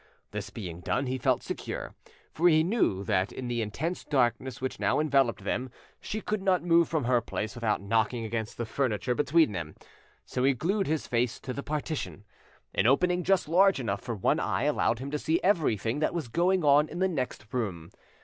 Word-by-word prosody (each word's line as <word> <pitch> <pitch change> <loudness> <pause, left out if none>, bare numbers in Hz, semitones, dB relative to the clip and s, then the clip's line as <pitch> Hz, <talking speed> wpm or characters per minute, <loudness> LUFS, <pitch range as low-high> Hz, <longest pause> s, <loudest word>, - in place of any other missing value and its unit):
This 105 -1 -5
being 90 -6 -7
done, 125 +9 -1
he 130 0 -2
felt - - +1
secure, - - -5 0.4
for 175 +3 +4
he 155 -1 +5
knew 170 - +1
that 95 -2 0
in 130 - -6
the 120 -1 -1
intense 150 - -3
darkness 125 -2 0
which 130 0 -4
now - - +2
enveloped 135 -5 +2
them 130 +1 -2 0.3
she 215 - -4
could 210 -1 -2
not 190 -2 +2
move 170 -1 +4
from 160 -4 0
her 120 0 +2
place 110 -1 -4
without 115 -5 -1
knocking 115 +2 0
against 110 -1 -4
the 120 - -2
furniture 125 0 -1
between 145 +1 +3
them, 85 -5 -5 0.5
so 125 - -2
he 135 0 +4
glued 190 - 0
his 155 -1 -1
face 120 0 0
to 130 - -5
the 140 - -4
partition. 145 -7 -4 0.5
An - - +2
opening 180 +7 +3
just 195 -3 +2
large 190 +2 +4
enough 100 -6 -2
for 120 -2 -4
one 95 - +1
eye - - -1
allowed 115 - +1
him 135 +3 -6
to 150 - -1
see 160 +3 +1
everything 145 - +1
that 155 +3 0
was 155 -8 -3
going 180 +6 +2
on 145 +1 +5
in - - -7
the 190 +1 +2
next 130 - -3
room. 95 -10 -3
130 Hz, 200 wpm, -28 LUFS, 115-165 Hz, 0.5 s, he